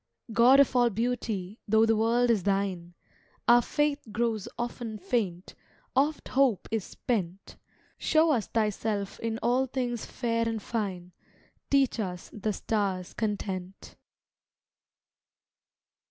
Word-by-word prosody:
God 245 +4 +6
of 280 -2 +4
all 245 -1 +5
beauty, 220 -3 -2
though 220 +2 +5
the 225 0 +3
world 235 +2 +3
is 215 -4 +2
thine, 190 -3 -1 0.5
Our 240 0 +7
faith 295 +3 0
grows 225 -2 -1
often 240 -2 -4
faint, 195 -6 -2 0.4
oft 290 +3 +1
hope 260 -7 +2
is 220 -3 0
spent; 195 -5 -4 0.4
Show 315 0 +3
us 235 -8 0
Thyself 210 -2 -1
in 225 -1 -2
all 250 +3 +2
things 245 -3 -3
fair 230 -2 -1
and 225 -1 -2
fine, 195 -5 -4 0.6
Teach 275 -4 +2
us 180 -4 -4
the 215 0 -2
stars' 195 -4 -2
content. 195 -3 -4
225 Hz, 120 wpm, -28 LUFS, 200-240 Hz, 0.6 s, Our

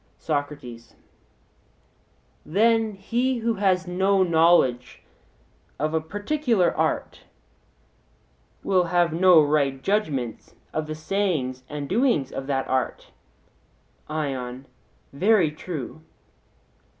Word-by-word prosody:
SOCRATES: 145 -6 -5 1.5
Then 225 +4 +2
he 240 +6 -1
who 230 0 0
has 190 -3 +1
no 190 +2 +2
knowledge 160 -8 +2 0.7
of 155 +2 -1
a 160 - +1
particular 205 - 0
art - - -2 1.4
will 185 -2 +2
have 175 -1 +1
no 180 0 +6
right 145 -2 +1
judgment 150 - -2 0.2
of 155 0 -2
the 155 - -4
sayings 155 -7 -2
and 145 -1 -5
doings 220 - +1
of 135 - -6
that 135 -2 -1
art? 130 0 -2 1.0
ION: 135 -4 -4 0.5
Very 185 +1 +3
true. 155 -2 -7
165 Hz, 95 wpm, -24 LUFS, 140-195 Hz, 1.5 s, no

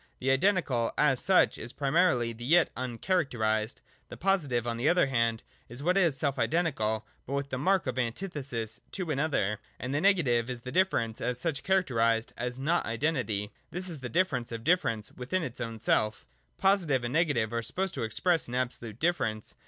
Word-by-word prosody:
The 130 +1 0
identical 135 - +2
as 135 -4 +3
such 190 -1 +3
is 120 - -6
primarily 135 -5 +2
the 115 +1 -10
yet 165 +6 +4
uncharacterised: 120 - -1 0.3
the - - -8
positive 150 -11 +1
on 120 -1 -2
the 125 +6 +2
other 175 -3 +4
hand 115 -4 0 0.3
is 120 +4 -7
what 180 +3 +2
is 170 -8 +3
self 140 -1 -1
identical, 120 -10 0 0.2
but 135 - -4
with 140 0 -2
the 130 - -2
mark 190 +4 +2
of 130 -1 -2
antithesis 125 - -3
to 180 -5 -3
an 140 - -1
other. 105 -9 0 0.2
And 125 +2 -4
the 145 - +1
negative 135 - +3
is 125 -2 -5
difference 125 - 0
as 125 0 -1
such, 155 0 -2
characterised 115 -12 +1
as 125 +1 -4
not 160 +6 0
identity. 110 -5 -1 0.2
This 180 +2 -5
is 165 -5 -7
the 125 -2 -6
difference 130 -7 0
of 115 -1 -5
difference 115 -10 +1
within 150 +9 -2
its 130 -7 -6
own 115 -1 -4
self 110 -1 +1 0.3
Positive 175 -10 +2
and 120 +1 -3
negative 145 -9 +1
are 115 - 0
supposed 190 +10 -2
to - - -3
express 165 - +1
an 120 - -5
absolute 120 -4 -3
difference. 120 -9 -1
130 Hz, 185 wpm, -29 LUFS, 115-170 Hz, 0.3 s, yet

